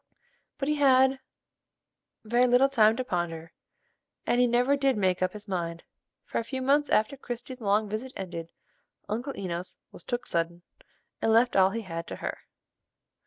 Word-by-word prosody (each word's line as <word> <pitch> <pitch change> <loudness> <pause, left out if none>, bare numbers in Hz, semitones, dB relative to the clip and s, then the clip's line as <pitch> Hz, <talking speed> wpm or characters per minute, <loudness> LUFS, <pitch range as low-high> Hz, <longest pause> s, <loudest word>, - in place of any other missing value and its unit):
But 275 - -3
he 300 0 +1
had 265 -1 +4 1.1
very 240 +3 +3
little 250 +3 +5
time 220 -4 +4
to 255 - -1
ponder, 170 -6 -3 0.7
and 245 - +2
he 250 - +5
never 245 +4 +3
did 275 -3 +1
make 185 -2 +1
up 185 0 +1
his 210 0 -9
mind; 170 -3 -3 0.4
for - - -2
a - - -2
few 260 +3 -4
months 285 +3 +2
after 220 +6 +2
Christie's 250 -1 -7
long 210 +1 +2
visit 220 +5 -4
ended, 170 -3 -6 0.6
Uncle 240 +7 -4
Enos 180 -1 -4
"was - - -11
took 245 0 -3
suddin'," 170 +1 -2 0.6
and 225 - +2
left 235 +2 +4
all 190 -1 +6
he 230 +4 -3
had 165 -4 -6
to - - -5
her. - - -5
225 Hz, 165 wpm, -28 LUFS, 185-255 Hz, 1.1 s, all